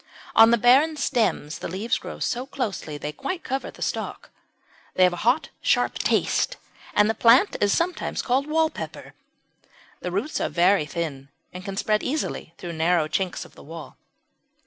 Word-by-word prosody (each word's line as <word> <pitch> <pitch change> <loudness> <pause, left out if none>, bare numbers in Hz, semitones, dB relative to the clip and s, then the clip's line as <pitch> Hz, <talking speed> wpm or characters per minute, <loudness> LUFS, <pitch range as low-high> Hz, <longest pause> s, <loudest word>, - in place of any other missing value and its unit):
On 225 0 +8
the 235 - +4
barren 270 +7 +4
stems 220 - 0
the - - -4
leaves 195 +7 -1
grow - - -8
so 250 +2 -2
closely 210 - -4
that - - -17
they 150 - -2
quite 330 - -5
cover 270 +1 -3
the - - -7
stalk. - - -4 0.6
They 185 - +4
have 180 -1 +5
a 175 +6 -4
hot 260 +6 +3
sharp - - +1
taste, - - +1 0.4
and 210 0 +5
the 220 - +1
plant 240 - +5
is 205 -1 +3
sometimes 345 - -1
called 265 +3 +1
"Wall 320 +1 +2
Pepper." - - -8 0.9
The 180 - -4
roots 210 - -2
are - - 0
very 175 -2 +3
thin 145 -5 -4 0.2
and 180 0 -8
can 195 0 -6
spread 215 +1 +1
easily 260 - -3
through 175 -1 -6
narrow 165 0 +2
chinks 180 +3 -2
of - - -17
the - - -15
wall. 165 +1 -10
210 Hz, 180 wpm, -24 LUFS, 170-265 Hz, 0.9 s, On